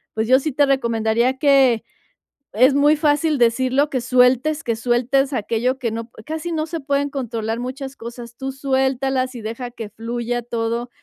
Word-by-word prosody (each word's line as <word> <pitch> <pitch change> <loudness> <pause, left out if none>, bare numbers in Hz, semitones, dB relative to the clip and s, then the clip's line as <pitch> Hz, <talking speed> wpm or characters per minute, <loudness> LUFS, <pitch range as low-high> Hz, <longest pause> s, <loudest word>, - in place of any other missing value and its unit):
pues, 220 0 -1
yo 260 +2 +5
sí 310 +3 -2
te 285 +2 +3
recomendaría 235 -1 +1
que, 270 -5 +4 0.7
es 255 +6 +5
muy 290 +2 +4
fácil 300 0 +1
decirlo, 255 +4 +2
que 255 - -1
sueltes 255 +5 +3
que 230 -2 -1
sueltes 250 +4 +1
aquello 245 +2 -1
que 240 -4 -2
no 230 +1 -4
p 220 - -15
casi 320 +2 -4
no 310 -1 -1
se 330 +1 -5
pueden 285 0 -1
controlar 230 -4 -3
muchas 265 +2 -6
cosas. 235 -1 -9
Tú 270 0 -4
suéltalas 265 -1 0
y 235 - -7
deja 230 +3 -5
que 225 -3 -7
fluya 235 +2 -3
todo. 235 0 -3
255 Hz, 175 wpm, -21 LUFS, 235-275 Hz, 0.7 s, yo